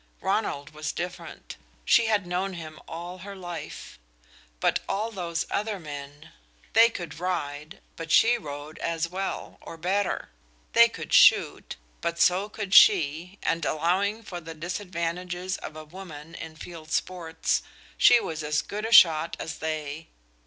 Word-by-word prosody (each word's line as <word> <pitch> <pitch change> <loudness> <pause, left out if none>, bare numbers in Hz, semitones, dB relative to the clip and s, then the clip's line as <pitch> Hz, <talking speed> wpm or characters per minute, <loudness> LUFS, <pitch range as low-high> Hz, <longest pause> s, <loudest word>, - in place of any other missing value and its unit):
Ronald 190 -8 -1
was 155 0 -4
different; 175 0 -7 0.3
she 230 - +5
had 210 -3 +1
known 185 +2 -2
him 155 -3 -8
all 175 +2 -7
her 200 +2 -8
life. 175 - -8 0.6
But - - +2
all 210 +4 -1
those 170 -5 -3
other 210 -1 -1
men! 145 0 -9 0.4
They 225 +1 +7
could 170 -8 -7
ride 155 -3 -3 0.2
but 165 0 -6
she 235 +2 +6
rode 145 -6 -7
as 165 0 -1
well, 190 +3 -5
or 165 - -9
better. 190 +4 -1 0.4
They 235 0 +7
could - - -7
shoot, - - +5 0.3
but 170 0 -2
so 185 +4 +3
could 205 -2 -5
she, 175 0 +5
and 165 0 0
allowing 190 +9 0
for 175 -4 -7
the 165 0 -9
disadvantages 180 +1 -3
of 155 - -8
a 155 0 -8
woman 165 -2 -10
in 160 -1 -8
field 160 0 -10
sports, 170 -2 -1 0.3
she 240 - +7
was 160 -7 -4
as 150 0 0
good 210 +2 -4
a - - -6
shot 165 -6 +6
as 160 - -5
they. 155 0 -4
170 Hz, 150 wpm, -27 LUFS, 155-195 Hz, 0.6 s, They